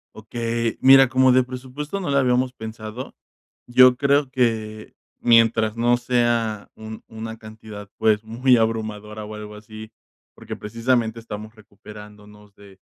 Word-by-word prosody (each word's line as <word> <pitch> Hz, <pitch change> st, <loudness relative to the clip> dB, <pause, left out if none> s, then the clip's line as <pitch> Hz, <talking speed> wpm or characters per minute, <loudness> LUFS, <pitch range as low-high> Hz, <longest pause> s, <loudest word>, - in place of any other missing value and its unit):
Okey, 115 Hz, +1 st, -3 dB
mira, 135 Hz, 0 st, +7 dB
como 130 Hz, +1 st, +3 dB
de 130 Hz, +1 st, +5 dB
presupuesto 130 Hz, +8 st, -6 dB
no 175 Hz, -, -4 dB
lo 140 Hz, -, +1 dB
habíamos 125 Hz, -1 st, +2 dB
pensado, 110 Hz, +1 st, -8 dB, 0.5 s
yo 125 Hz, +1 st, +6 dB
creo 140 Hz, 0 st, +1 dB
que 110 Hz, -4 st, -2 dB, 0.2 s
mientras 115 Hz, -2 st, +3 dB
no 120 Hz, +1 st, +2 dB
sea 120 Hz, -3 st, -1 dB
un 110 Hz, 0 st, -9 dB
una 110 Hz, 0 st, -7 dB
cantidad, 110 Hz, -2 st, -11 dB
pues, 110 Hz, -1 st, +2 dB
muy 120 Hz, +3 st, +2 dB
abrumadora 110 Hz, -1 st, -3 dB
o 105 Hz, +1 st, -9 dB
algo 105 Hz, 0 st, -9 dB
así, 110 Hz, +1 st, -11 dB, 0.4 s
porque -, -, -8 dB
precisamente 115 Hz, +1 st, -1 dB
estamos 110 Hz, 0 st, -9 dB
recuperándonos 105 Hz, 0 st, -15 dB
de 100 Hz, -2 st, -17 dB
115 Hz, 135 wpm, -22 LUFS, 110-125 Hz, 0.5 s, mira